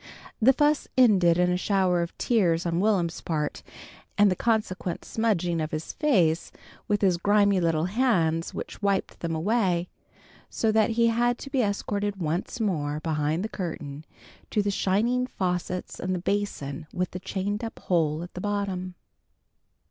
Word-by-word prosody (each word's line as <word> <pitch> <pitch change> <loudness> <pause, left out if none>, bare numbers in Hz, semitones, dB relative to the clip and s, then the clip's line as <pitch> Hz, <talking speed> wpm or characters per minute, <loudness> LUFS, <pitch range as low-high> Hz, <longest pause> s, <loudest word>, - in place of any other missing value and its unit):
The 250 +5 +7
fuss 295 +2 +2
ended 190 -9 +5
in 180 0 +3
a 180 - +1
shower 185 -2 +1
of 170 - -5
tears 180 -8 +2
on 170 0 0
Will'm's 185 -5 +1
part, 150 -3 -2 0.6
and 205 -1 +5
the - - +1
consequent 210 -5 -1
smudging 180 -7 0
of 155 - -2
his 155 0 -5
face 175 - +2 0.4
with 205 -1 +1
his 185 -3 +4
grimy 200 +1 +3
little 165 -2 +1
hands 180 -7 +1
which - - -7
wiped 200 -1 0
them 165 -1 -2
away, 180 -1 +1 0.6
so 225 - 0
that 220 +1 +3
he 230 0 +5
had 240 +1 +1
to 275 - -9
be 265 - +2
escorted 205 -1 -1
once 175 +6 -3
more 155 -9 -1
behind 155 +2 -1
the - - -1
curtain 155 -7 -6 0.5
to 210 - +1
the 200 - 0
shining 230 +7 +1
faucets 180 -3 -3
and 185 0 -1
the - - -2
basin 170 -7 -3
with 180 0 -2
the 180 - -5
chained 200 +4 -3
up 225 - -5
hole 160 -3 0
at 175 - -10
the 180 - -6
bottom. 195 -3 -2
185 Hz, 165 wpm, -26 LUFS, 170-210 Hz, 0.6 s, The